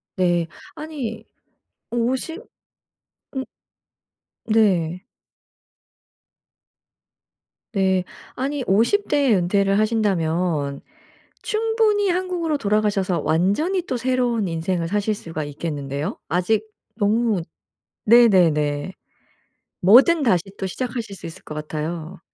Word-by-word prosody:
네. 175 Hz, -3 st, +1 dB, 0.3 s
아니 260 Hz, -8 st, -5 dB, 0.7 s
50 250 Hz, +7 st, -1 dB, 0.9 s
음. 265 Hz, -, -1 dB, 1.0 s
네. 185 Hz, -6 st, +2 dB, 2.7 s
네. 190 Hz, -2 st, +2 dB, 0.3 s
아니 275 Hz, +1 st, -2 dB
50 230 Hz, -, +2 dB
대에 275 Hz, -7 st, +3 dB
은퇴를 195 Hz, +2 st, +2 dB
하신다면 175 Hz, -9 st, 0 dB, 0.6 s
충분히 430 Hz, -2 st, +1 dB
한국으로 350 Hz, -4 st, -1 dB
돌아가셔서 200 Hz, -, +1 dB
완전히 195 Hz, -, +1 dB
또 295 Hz, -7 st, -3 dB
새로운 245 Hz, -3 st, 0 dB
인생을 165 Hz, 0 st, -2 dB
사실 210 Hz, +2 st, 0 dB
수가 165 Hz, -6 st, -5 dB
있겠는데요. 145 Hz, -1 st, -4 dB
아직 205 Hz, +5 st, +1 dB, 0.3 s
너무 215 Hz, -1 st, +1 dB, 0.7 s
네네네. 180 Hz, -9 st, +4 dB, 0.9 s
뭐든 270 Hz, -, +6 dB
다시 185 Hz, -9 st, +3 dB, 0.2 s
또 195 Hz, -, -3 dB
시작하실 230 Hz, +1 st, -4 dB
수 175 Hz, -, -8 dB
있을 165 Hz, -, -11 dB
것 -, -, -8 dB
같아요. 155 Hz, +3 st, -5 dB
200 Hz, 190 characters per minute, -22 LUFS, 170-250 Hz, 2.7 s, 뭐든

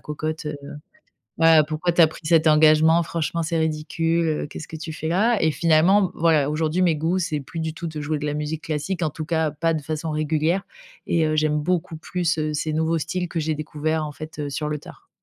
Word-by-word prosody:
cocotte. 155 Hz, +1 st, -4 dB
Heu, 150 Hz, -1 st, -3 dB, 0.8 s
ben 165 Hz, -1 st, +6 dB
pourquoi 155 Hz, +3 st, -1 dB
tu 175 Hz, -, +2 dB
as -, -, +8 dB
pris 155 Hz, -, -9 dB
cet 165 Hz, 0 st, +3 dB
engagement? 155 Hz, +2 st, +5 dB
Franchement, 165 Hz, 0 st, -2 dB
c'est 165 Hz, +1 st, -1 dB
ridicule, 165 Hz, +1 st, 0 dB
heu. 155 Hz, -2 st, -1 dB
Qu'est-ce 155 Hz, -, -8 dB
que 160 Hz, -, -7 dB
tu 160 Hz, 0 st, -6 dB
fais 160 Hz, -, -4 dB
là?» 215 Hz, +7 st, +2 dB
et 160 Hz, -, +4 dB
finalement, 175 Hz, +5 st, +3 dB
voilà, 155 Hz, -4 st, +3 dB
aujourd'hui, 155 Hz, +3 st, 0 dB
mes 170 Hz, -3 st, +3 dB
goûts, 165 Hz, +5 st, 0 dB
c'est 155 Hz, -4 st, -2 dB
plus 160 Hz, +4 st, -7 dB
du 160 Hz, 0 st, -3 dB
tout 170 Hz, -, -6 dB
de 155 Hz, -1 st, -6 dB
jouer 150 Hz, +1 st, -2 dB
de 150 Hz, -, -6 dB
la 150 Hz, -, -1 dB
musique 150 Hz, +1 st, -4 dB
classique, 160 Hz, +4 st, -3 dB
en 155 Hz, -, +1 dB
tout 155 Hz, +1 st, -6 dB
cas, 160 Hz, -1 st, +1 dB
pas 165 Hz, +2 st, 0 dB
de 155 Hz, -, -3 dB
façon 155 Hz, +2 st, -4 dB
régulière, 155 Hz, +4 st, 0 dB, 0.4 s
et 165 Hz, -2 st, +2 dB
heu, 155 Hz, 0 st, 0 dB
j'aime 155 Hz, 0 st, +2 dB
beaucoup 175 Hz, 0 st, -1 dB
plus, 175 Hz, 0 st, -1 dB
heu, 155 Hz, 0 st, -1 dB
ces 155 Hz, +1 st, -2 dB
nouveaux 160 Hz, +1 st, +1 dB
styles 180 Hz, +3 st, -3 dB
que 170 Hz, -, -4 dB
j'ai 155 Hz, 0 st, -1 dB
découverts, 155 Hz, +1 st, -2 dB
en 150 Hz, -, -7 dB
fait, 155 Hz, 0 st, -10 dB
heu, 145 Hz, -, -3 dB
sur 150 Hz, +2 st, -3 dB
le 150 Hz, -, -2 dB
tard. -, -, -15 dB
160 Hz, 235 wpm, -23 LUFS, 155-165 Hz, 0.8 s, as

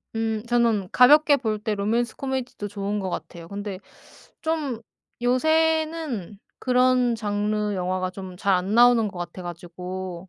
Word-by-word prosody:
음 225 Hz, -1 st, -1 dB
저는 230 Hz, -5 st, +2 dB
가볍게 290 Hz, +4 st, +6 dB
볼 220 Hz, -4 st, -2 dB
때 210 Hz, 0 st, -2 dB
로맨스 225 Hz, +4 st, 0 dB
코미디도 260 Hz, -6 st, -4 dB
좋은 205 Hz, 0 st, -3 dB
것 190 Hz, -2 st, -3 dB
같아요. 165 Hz, 0 st, -7 dB
근데 200 Hz, 0 st, -6 dB, 0.6 s
좀 305 Hz, -8 st, -2 dB, 0.4 s
요새는 315 Hz, -, +1 dB, 0.2 s
그런 250 Hz, -1 st, +3 dB
장르 210 Hz, -1 st, -1 dB
영화가 185 Hz, 0 st, -1 dB
좀 185 Hz, -1 st, -9 dB
잘 195 Hz, +1 st, +2 dB
안 185 Hz, +4 st, 0 dB
나오는 240 Hz, -2 st, +6 dB
것 190 Hz, -, -9 dB
같아 175 Hz, +1 st, -6 dB
가지고 180 Hz, +1 st, -7 dB
210 Hz, 270 characters per minute, -24 LUFS, 185-250 Hz, 0.6 s, 가볍게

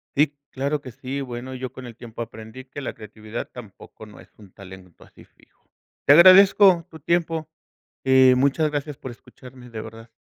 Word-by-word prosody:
Sí, 145 Hz, 0 st, +2 dB, 0.2 s
claro 140 Hz, +2 st, -2 dB
que 130 Hz, -, -10 dB
sí. 135 Hz, +4 st, -6 dB
Bueno, 125 Hz, 0 st, -7 dB
yo 130 Hz, -1 st, -6 dB
con 130 Hz, -1 st, -11 dB
el 115 Hz, -, -11 dB
tiempo 120 Hz, -1 st, -10 dB
aprendí 110 Hz, +2 st, -10 dB
que 140 Hz, +2 st, -9 dB
la -, -, -5 dB
creatividad 110 Hz, +2 st, -9 dB
tampoco 110 Hz, -1 st, -13 dB
no 105 Hz, -, -15 dB
es -, -, -17 dB
un 100 Hz, -3 st, -17 dB
talento 95 Hz, -3 st, -14 dB
así -, -, -19 dB
fijo. -, -, -30 dB, 0.4 s
Te 140 Hz, -, +7 dB
agradezco 185 Hz, +1 st, +7 dB
tu 160 Hz, -2 st, -13 dB
tiempo, 165 Hz, 0 st, -1 dB, 0.6 s
y 130 Hz, -1 st, +5 dB
muchas 140 Hz, +4 st, +1 dB
gracias 145 Hz, -1 st, -4 dB
por 130 Hz, -, -8 dB
escucharme, 125 Hz, +1 st, -15 dB
de 110 Hz, -1 st, -7 dB
verdad. 115 Hz, +1 st, -12 dB
130 Hz, 180 wpm, -23 LUFS, 115-145 Hz, 0.6 s, Te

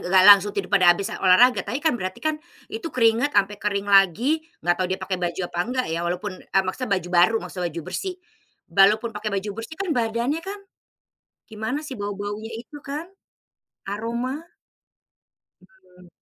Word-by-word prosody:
nggak 185 Hz, 0 st, +5 dB
langsung 205 Hz, 0 st, +8 dB
tidur 195 Hz, 0 st, -3 dB
pada 185 Hz, -3 st, +5 dB
habis, 200 Hz, +4 st, -4 dB
eee, -, -, -6 dB
olahraga, 215 Hz, +7 st, +5 dB
tapi 235 Hz, +6 st, -4 dB
kan, 310 Hz, 0 st, +1 dB
berarti 185 Hz, -5 st, -4 dB
kan 310 Hz, -1 st, -1 dB, 0.3 s
itu 445 Hz, -7 st, -4 dB
keringat 235 Hz, +1 st, +2 dB
sampai 200 Hz, +1 st, +2 dB
kering 200 Hz, -2 st, -1 dB
lagi, 205 Hz, -, +4 dB, 0.2 s
nggak 175 Hz, -, +3 dB
tahu 185 Hz, -, +1 dB
dia 185 Hz, -, -1 dB
pakai 185 Hz, -1 st, -4 dB
baju 175 Hz, +1 st, -2 dB
apa 175 Hz, -, -6 dB
enggak 250 Hz, +6 st, -1 dB
ya, 165 Hz, -, -1 dB
walaupun 180 Hz, +4 st, -3 dB
eee, 195 Hz, -, +1 dB
maksudnya 225 Hz, +7 st, -4 dB
baju 180 Hz, -1 st, -5 dB
baru, 180 Hz, +6 st, +5 dB
maksudnya 180 Hz, -2 st, -4 dB
baju 170 Hz, +1 st, -6 dB
bersih. 375 Hz, -2 st, -3 dB, 0.5 s
Walaupun 210 Hz, +4 st, +4 dB
pake 210 Hz, -1 st, -4 dB
baju 200 Hz, +2 st, -2 dB
bersih 270 Hz, +8 st, -8 dB
kan 390 Hz, -3 st, -3 dB
badannya 235 Hz, +4 st, 0 dB
kan, 400 Hz, +1 st, -4 dB, 0.9 s
gimana 220 Hz, +6 st, -3 dB
sih, 295 Hz, -4 st, -7 dB
bau-baunya 205 Hz, +2 st, -5 dB
itu 235 Hz, +6 st, -9 dB
kan? 295 Hz, +4 st, -5 dB, 0.8 s
Aroma. 235 Hz, +7 st, -3 dB, 1.2 s
Mmm. 185 Hz, -1 st, -21 dB
210 Hz, 170 wpm, -23 LUFS, 190-250 Hz, 1.2 s, langsung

